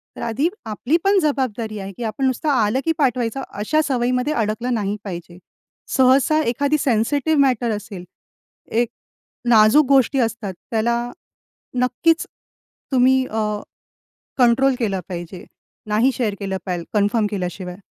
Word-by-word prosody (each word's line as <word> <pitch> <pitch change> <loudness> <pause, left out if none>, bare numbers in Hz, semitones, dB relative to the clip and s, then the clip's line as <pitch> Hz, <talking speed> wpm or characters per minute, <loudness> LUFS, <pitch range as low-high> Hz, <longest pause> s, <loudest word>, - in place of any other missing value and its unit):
तर - - -9
आधी 235 +7 0 0.2
आपली 225 +7 -1
पण 395 0 +4
जबाबदारी 250 -8 -1
आहे 195 0 -6
की 245 - -5
आपण 225 +4 -2
नुसतं 260 +4 0
आलं 240 -2 +2
की 325 - +2
पाठवायचं 255 -3 0 0.2
अशा 310 +9 +2
सवयीमध्ये 250 +2 0
अडकलं 230 +2 -1
नाही 205 -2 -1
पाहिजे. 175 -2 -7 0.5
सहसा 265 +4 +4
एखादी 285 +5 +1
सेन्सिटिव्ह 285 +5 +1
मॅटर 250 -4 +2
असेल, 205 -3 -8 0.7
एक 235 +1 +1 0.6
नाजूक 225 +6 +6
गोष्टी 270 0 +4
असतात, 225 -4 -1 0.2
त्याला 235 +1 +1 0.9
नक्कीच 320 +7 +2 0.7
तुम्ही 260 0 +4
अ, 220 - -2 1.0
कंट्रोल 255 +2 +4
केलं 200 -5 -1
पाहिजे. 175 0 -7 0.5
नाही 225 +6 +3
शेअर 225 -4 -1
केलं 195 -2 -3
पाहिजेल, 175 -3 -3
कन्फर्म 210 +1 +2
केल्याशिवाय. 180 -2 -4
235 Hz, 130 wpm, -21 LUFS, 210-265 Hz, 1.0 s, नाजूक